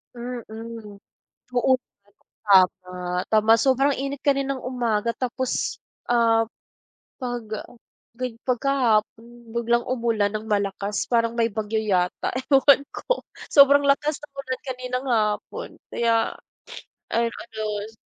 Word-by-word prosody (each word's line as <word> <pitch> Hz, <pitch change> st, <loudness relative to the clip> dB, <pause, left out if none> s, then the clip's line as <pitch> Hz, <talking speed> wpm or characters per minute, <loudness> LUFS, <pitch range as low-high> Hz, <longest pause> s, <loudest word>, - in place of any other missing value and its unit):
Mm. 230 Hz, -3 st, -7 dB, 0.6 s
Oo 255 Hz, +2 st, +4 dB
naman, 205 Hz, -3 st, -35 dB, 0.3 s
tama. 185 Hz, -2 st, +4 dB, 0.4 s
Tama 215 Hz, +1 st, +5 dB
sobrang 270 Hz, +3 st, +2 dB
init 275 Hz, +1 st, -4 dB
kaninang 275 Hz, -2 st, 0 dB
umaga 235 Hz, -3 st, -1 dB
tapos, 255 Hz, 0 st, -2 dB, 0.2 s
ah, 230 Hz, -1 st, +3 dB, 0.7 s
'pag 245 Hz, -3 st, -4 dB, 0.7 s
ga 250 Hz, +2 st, -3 dB, 0.2 s
pagkahapon 245 Hz, -4 st, +1 dB, 0.3 s
biglang 235 Hz, 0 st, +2 dB
umulan 230 Hz, -4 st, +1 dB
ng 215 Hz, +1 st, -4 dB
malakas 200 Hz, -1 st, -1 dB
parang 230 Hz, -1 st, +2 dB
may 230 Hz, -1 st, +1 dB
bagyo 220 Hz, +1 st, -2 dB
yata, 185 Hz, -4 st, 0 dB, 0.2 s
ewan 280 Hz, +1 st, +6 dB
ko -, -, -2 dB, 0.3 s
sobrang 280 Hz, 0 st, +7 dB
lakas 290 Hz, +1 st, +2 dB
ng 295 Hz, -, -13 dB
ulan 260 Hz, -2 st, -4 dB
kaninang 255 Hz, 0 st, -4 dB
hapon 215 Hz, -3 st, -1 dB, 0.2 s
kaya 230 Hz, -1 st, +1 dB, 0.8 s
ayun 230 Hz, 0 st, +1 dB
ano, 220 Hz, -2 st, -8 dB, 0.2 s
yan. 215 Hz, -, -9 dB
235 Hz, 115 wpm, -24 LUFS, 220-260 Hz, 0.8 s, sobrang